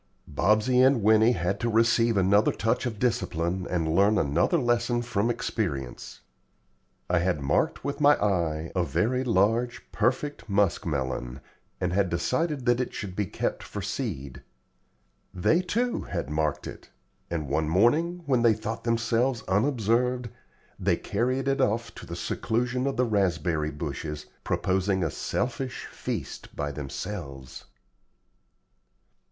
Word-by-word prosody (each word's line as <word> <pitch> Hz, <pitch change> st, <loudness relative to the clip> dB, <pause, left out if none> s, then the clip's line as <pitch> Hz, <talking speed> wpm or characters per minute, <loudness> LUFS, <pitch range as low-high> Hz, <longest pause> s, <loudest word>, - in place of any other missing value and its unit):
Bobsey 105 Hz, -, +3 dB
and 130 Hz, -4 st, +4 dB
Winnie 110 Hz, +3 st, +5 dB
had 95 Hz, 0 st, -1 dB
to 120 Hz, -, 0 dB
receive 115 Hz, 0 st, +3 dB
another 100 Hz, +3 st, +4 dB
touch 110 Hz, +4 st, 0 dB
of 110 Hz, -3 st, -5 dB
discipline 95 Hz, -7 st, -1 dB
and 80 Hz, -3 st, 0 dB
learn 100 Hz, +3 st, +4 dB
another 80 Hz, -, +2 dB
lesson 120 Hz, -2 st, +1 dB
from 115 Hz, -2 st, 0 dB
experience. 75 Hz, -, -3 dB, 0.9 s
I 90 Hz, -1 st, +2 dB
had 90 Hz, -2 st, 0 dB
marked 70 Hz, -1 st, 0 dB
with 140 Hz, +1 st, -3 dB
my 145 Hz, 0 st, +7 dB
eye 85 Hz, -6 st, -1 dB
a 90 Hz, -, +2 dB
very 115 Hz, -, 0 dB
large, 115 Hz, +2 st, +1 dB
perfect 145 Hz, -1 st, -1 dB
musk 100 Hz, -3 st, +1 dB
melon, 65 Hz, -3 st, -3 dB, 0.4 s
and 90 Hz, -2 st, -1 dB
had 95 Hz, -1 st, +2 dB
decided 135 Hz, -, -1 dB
that 120 Hz, -1 st, +3 dB
it 125 Hz, -, -4 dB
should 95 Hz, -3 st, -5 dB
be 105 Hz, -1 st, -1 dB
kept -, -, -2 dB
for 100 Hz, -, -6 dB
seed. 85 Hz, -, -4 dB, 0.9 s
They, 155 Hz, -, +3 dB
too, 235 Hz, +7 st, -1 dB
had 75 Hz, -, -4 dB
marked 75 Hz, -1 st, -1 dB
it; -, -, -9 dB, 0.4 s
and 80 Hz, -4 st, -3 dB
one 75 Hz, +3 st, 0 dB
morning, 155 Hz, -, +2 dB
when 130 Hz, -4 st, +2 dB
they 115 Hz, -2 st, +5 dB
thought 110 Hz, +1 st, -5 dB
themselves 115 Hz, +1 st, +1 dB
unobserved, 120 Hz, +3 st, +1 dB, 0.5 s
they -, -, +2 dB
carried 130 Hz, +5 st, -1 dB
it 135 Hz, 0 st, +1 dB
off 115 Hz, -1 st, 0 dB
to -, -, -11 dB
the -, -, -5 dB
seclusion 125 Hz, +3 st, -1 dB
of 135 Hz, -2 st, -2 dB
the 125 Hz, -, +3 dB
raspberry 85 Hz, -7 st, 0 dB
bushes, 75 Hz, 0 st, -5 dB, 0.2 s
proposing 95 Hz, 0 st, 0 dB
a 80 Hz, -, -1 dB
selfish 130 Hz, +1 st, -3 dB
feast -, -, -6 dB
by 75 Hz, 0 st, -2 dB
themselves. 70 Hz, -3 st, -6 dB
105 Hz, 140 wpm, -27 LUFS, 85-120 Hz, 0.9 s, my